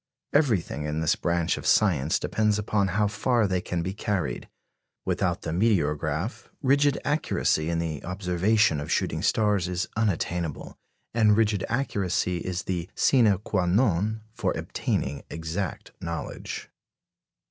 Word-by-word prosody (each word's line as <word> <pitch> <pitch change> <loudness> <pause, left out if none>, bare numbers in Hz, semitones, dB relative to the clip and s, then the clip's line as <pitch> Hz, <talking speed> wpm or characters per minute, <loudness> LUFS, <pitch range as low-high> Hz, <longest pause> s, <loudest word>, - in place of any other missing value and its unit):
Everything 105 - +1
in 75 +1 -2
this 80 -1 +2
branch 85 -1 0
of - - -5
science 80 -8 +3
depends 105 -1 +1
upon 105 -1 +1
how 105 +3 +1
far 115 +2 +1
they 95 -2 0
can 85 -2 -2
be 95 +2 -3
carried. 95 - -2 0.6
Without - - 0
the - - -3
meteorograph, 85 - 0 0.2
rigid 140 +1 +3
accuracy 145 - +1
in 85 - 0
the 80 -3 -3
observation 90 0 +2
of 75 - -5
shooting - - 0
stars 105 -5 +2
is 90 +2 -1
unattainable, 90 -6 -1 0.4
and 110 -2 +4
rigid 105 -4 +2
accuracy 100 -8 0
is 90 +1 -3
the 90 -2 -3
sine 125 -4 +4
quâ 95 -3 +1
non 105 0 +2
for - - -1
obtaining 70 +1 -2
exact 80 +2 -4
knowledge. 85 0 -5
95 Hz, 135 wpm, -26 LUFS, 85-110 Hz, 0.6 s, and